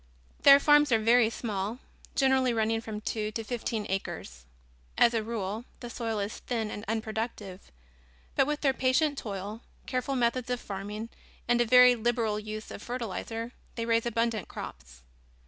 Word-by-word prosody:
Their 280 0 +9
farms 295 -1 +5
are 225 - +6
very 225 +1 +4
small, 215 -1 -3 0.4
generally 265 -2 +3
running 225 0 +1
from 215 -2 -6
two 215 0 -2
to 225 - -3
fifteen 225 -2 -3
acres. 65 - -5 0.5
As 240 - +5
a 225 - +1
rule, 215 -1 -3 0.2
the 240 -1 -7
soil 225 -2 -3
is 205 +1 -3
thin 225 -3 -3
and 210 - -6
unproductive, 220 -3 -4 0.6
but 270 - +3
with 295 0 -2
their 275 -2 +3
patient 265 +4 +2
toil, 205 -2 -5 0.2
careful 260 +2 -2
methods 245 0 0
of 250 -1 -1
farming 205 +3 -6 0.4
and 240 0 +3
a - - +3
very 250 +1 +8
liberal 230 -2 0
use 215 +1 -7
of - - -8
fertilizer 230 -1 -4 0.2
they 230 - -2
raise 230 0 +2
abundant 230 -2 0
crops. 60 -1 -9
230 Hz, 160 wpm, -29 LUFS, 215-245 Hz, 0.6 s, Their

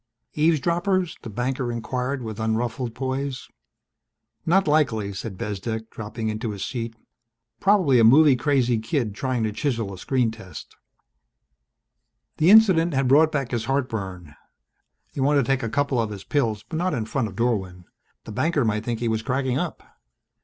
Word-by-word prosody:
"Eavesdroppers?" 170 +4 +1
the 115 - -8
banker 125 +3 -2
inquired 125 +3 -3
with 110 -1 -6
unruffled 115 +2 -2
poise. 135 +1 -3 1.0
"Not 190 +2 +3
likely," 115 -10 +1
said 95 0 -6
Bezdek, 110 +3 -4
dropping 110 +1 -5
into 110 +1 -3
his 100 -2 -4
seat. 115 -2 -4 0.6
"Probably 185 -11 +4
a - - +5
movie 140 +5 +7
crazy 125 -3 +1
kid 110 -1 -2
trying 125 +1 -2
to 110 - 0
chisel 115 -5 -2
a 95 - -9
screen 125 0 +1
test." 95 -9 -11 1.6
The 160 - +4
incident 185 -7 +6
had 135 -1 +2
brought 155 +4 +5
back 135 -4 -2
his 120 -2 -2
heartburn. 100 - -3 0.8
He - - -6
wanted 140 +1 +3
to - - -6
take 135 - +1
a 115 - -2
couple 140 -1 +1
of 110 - -2
his 100 -2 -8
pills 110 -6 -1
but 160 - -4
not 185 +1 0
in 115 -3 -2
front 110 +1 -1
of 95 - -10
Dorwin. 95 -6 -1 0.4
The - - -9
banker 150 +4 +1
might 105 -1 0
think 115 -1 -3
he 120 - 0
was 110 -1 0
cracking 130 +1 -1
up. - - -4
120 Hz, 165 wpm, -24 LUFS, 110-140 Hz, 1.6 s, movie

